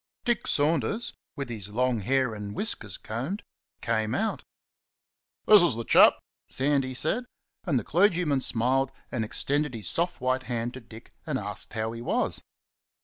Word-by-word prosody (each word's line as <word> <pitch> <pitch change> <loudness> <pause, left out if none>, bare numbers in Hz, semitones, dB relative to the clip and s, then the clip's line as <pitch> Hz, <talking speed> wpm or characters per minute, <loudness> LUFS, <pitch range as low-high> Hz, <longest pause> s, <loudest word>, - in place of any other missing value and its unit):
Dick 240 -3 0
Saunders, 155 - +1 0.2
with 140 -1 -4
his 105 -4 -6
long 125 +2 +1
hair 130 +3 +1
and 105 -1 -6
whiskers 105 - -3
combed, 130 - -4 0.4
came 110 -1 0
out. 220 +1 -1 1.0
"This 210 -1 +8
is 175 -9 +3
the 115 - -3
chap!" - - +7 0.3
Sandy 135 -1 0
said, 220 - +1 0.4
and 135 - +2
the 115 - -1
clergyman 170 - +2
smiled 130 +3 +1 0.2
and 120 - -1
extended 145 +4 -1
his 110 - -3
soft 175 +1 -1
white 130 0 +1
hand 120 0 -2
to 130 - -7
Dick 115 0 -14
and - - 0
asked - - -5
how 110 0 -2
he 115 0 -7
was. 120 - 0
130 Hz, 155 wpm, -27 LUFS, 115-150 Hz, 1.0 s, This